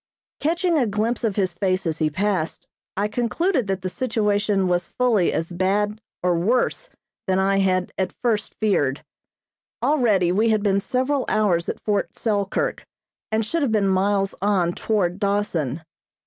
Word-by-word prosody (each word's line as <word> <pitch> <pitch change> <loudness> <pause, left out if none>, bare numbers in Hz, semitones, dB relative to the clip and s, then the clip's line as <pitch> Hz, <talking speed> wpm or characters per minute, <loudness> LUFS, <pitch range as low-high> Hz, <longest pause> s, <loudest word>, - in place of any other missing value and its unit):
Catching 340 +1 +1
a 245 - +2
glimpse 220 +4 -1
of 215 -4 0
his 185 -3 0
face 185 +1 0
as 160 -1 -2
he 155 -1 +2
passed, 185 0 -2 0.3
I 205 +1 +1
concluded 245 - 0
that 190 -1 -2
the - - -1
situation 210 -4 0
was 175 -1 0
fully 230 -8 +2
as 165 +2 -2
bad 205 +4 0 0.2
or 175 -2 +2
worse 245 - 0 0.4
than 185 0 +2
I 195 +1 +2
had 185 -1 +1
at 185 -1 -1
first 220 -3 0
feared. 145 -10 +1 0.8
Already 215 - +3
we 215 +5 +2
had 215 -2 +2
been 200 -1 +2
several 260 +6 0
hours 195 -6 +1
at - - -4
Fort 205 -2 -1
Selkirk 205 -3 -1 0.5
and 220 0 +1
should 330 +9 -1
have 275 -5 +1
been 210 -3 +2
miles 195 +1 +1
on 190 -4 +2
toward 190 -4 -1
Dawson. 175 -8 -1
205 Hz, 160 wpm, -23 LUFS, 185-220 Hz, 0.8 s, Already